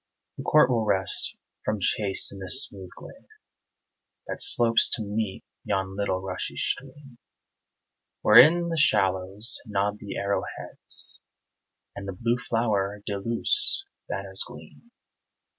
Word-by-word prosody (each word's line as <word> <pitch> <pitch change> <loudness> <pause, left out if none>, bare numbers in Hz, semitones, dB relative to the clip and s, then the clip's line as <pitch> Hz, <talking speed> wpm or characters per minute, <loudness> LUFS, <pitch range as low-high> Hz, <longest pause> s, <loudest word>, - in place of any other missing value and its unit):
The - - -7
court 150 -4 +3
will 115 -2 0
rest 95 -3 0 0.3
from 110 -1 -2
chase 100 0 0
in 100 - -11
this 95 +9 +2
smooth 95 -2 -12
glade 275 - -14 1.0
That - - -4
slopes 115 - +5
to 110 - -6
meet 105 -1 -4 0.2
yon 95 0 -3
little 100 -2 -2
rushy 95 -1 -6
stream, 135 -1 -5 1.0
Where 110 +3 +9
in 170 +2 +1
the 165 - -3
shallows 95 - 0
nod 105 0 -2
the 100 - -8
arrow 100 0 -1 0.2
heads, - - 0 0.7
And 100 - -8
the 95 -2 -7
blue 120 +1 -1
flower 105 -4 -2
de 100 -2 -4
luce's 390 - +5 0.2
banners - - -3
gleam. 235 - -15
105 Hz, 130 wpm, -25 LUFS, 100-125 Hz, 1.0 s, Where